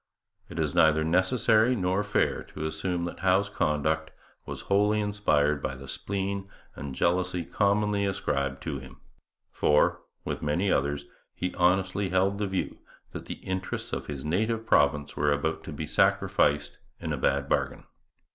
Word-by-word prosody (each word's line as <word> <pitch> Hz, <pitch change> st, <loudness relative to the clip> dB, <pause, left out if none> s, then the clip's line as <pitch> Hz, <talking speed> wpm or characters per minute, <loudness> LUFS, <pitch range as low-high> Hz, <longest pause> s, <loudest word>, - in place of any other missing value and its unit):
It -, -, -9 dB
is -, -, 0 dB
neither 80 Hz, 0 st, +4 dB
necessary 110 Hz, +8 st, +3 dB
nor 95 Hz, -1 st, +1 dB
fair 105 Hz, 0 st, +1 dB
to 80 Hz, -, -6 dB
assume 85 Hz, +3 st, -2 dB
that 85 Hz, -, -6 dB
Howe's 95 Hz, +2 st, +2 dB
conduct 80 Hz, -3 st, 0 dB, 0.4 s
was -, -, -5 dB
wholly 105 Hz, +2 st, +2 dB
inspired 75 Hz, -9 st, +1 dB
by 65 Hz, -, -3 dB
the 65 Hz, +1 st, -10 dB
spleen 100 Hz, +5 st, -3 dB, 0.3 s
and 70 Hz, -2 st, -6 dB
jealousy 90 Hz, +1 st, +1 dB
commonly 100 Hz, +1 st, +1 dB
ascribed 70 Hz, -8 st, -1 dB
to 75 Hz, -4 st, -3 dB
him; 65 Hz, -1 st, -13 dB, 0.5 s
for, 75 Hz, 0 st, +3 dB, 0.2 s
with -, -, -3 dB
many 85 Hz, +7 st, +1 dB
others, 70 Hz, +1 st, 0 dB, 0.3 s
he 90 Hz, -, -3 dB
honestly 95 Hz, +2 st, +2 dB
held 95 Hz, +2 st, +1 dB
the 105 Hz, -, 0 dB
view 95 Hz, -1 st, -3 dB, 0.3 s
that -, -, -7 dB
the -, -, -8 dB
interests 95 Hz, 0 st, -4 dB
of -, -, -3 dB
his 70 Hz, -2 st, -6 dB
native 110 Hz, +8 st, 0 dB
province 75 Hz, -6 st, +2 dB
were 75 Hz, 0 st, +2 dB
about 70 Hz, +2 st, -1 dB
to -, -, -6 dB
be 75 Hz, +1 st, -4 dB
sacrificed 75 Hz, -1 st, +2 dB, 0.2 s
in -, -, -3 dB
a -, -, -2 dB
bad 70 Hz, 0 st, +1 dB
bargain. -, -, -1 dB
90 Hz, 155 wpm, -28 LUFS, 75-100 Hz, 0.5 s, neither